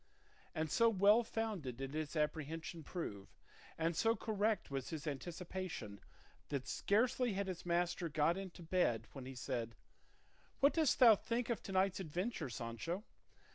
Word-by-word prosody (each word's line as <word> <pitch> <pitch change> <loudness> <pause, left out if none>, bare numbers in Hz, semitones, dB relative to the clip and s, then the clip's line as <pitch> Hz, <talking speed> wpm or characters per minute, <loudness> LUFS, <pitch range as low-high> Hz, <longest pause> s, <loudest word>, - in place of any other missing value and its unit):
And 155 -2 -1
so 230 0 +5
well 205 +2 +6
founded 210 - -3
did 135 +1 -5
his 155 0 -3
apprehension 160 +2 -2
prove, 105 - -5 0.5
and 165 +1 +1
so 225 +6 +3
correct 215 -5 0
was 135 -2 -3
his 155 -4 -5
anticipation, 165 - -5 0.5
that 140 -3 -2
scarcely 245 +2 +2
had 200 +1 -1
his 185 -2 -5
master 175 0 +1
got 155 +3 +2
into 190 -2 -7
bed 160 -10 +1
when 130 -2 -8
he 130 - -7
said, 115 -2 -3 0.8
"What 280 +2 +5
dost 315 -4 +3
thou 230 -4 +9
think 235 +3 -2
of 230 - -1
to - - -7
night's 190 0 +2
adventure, 180 - -2
Sancho? 120 - -4
175 Hz, 150 wpm, -38 LUFS, 145-205 Hz, 0.8 s, thou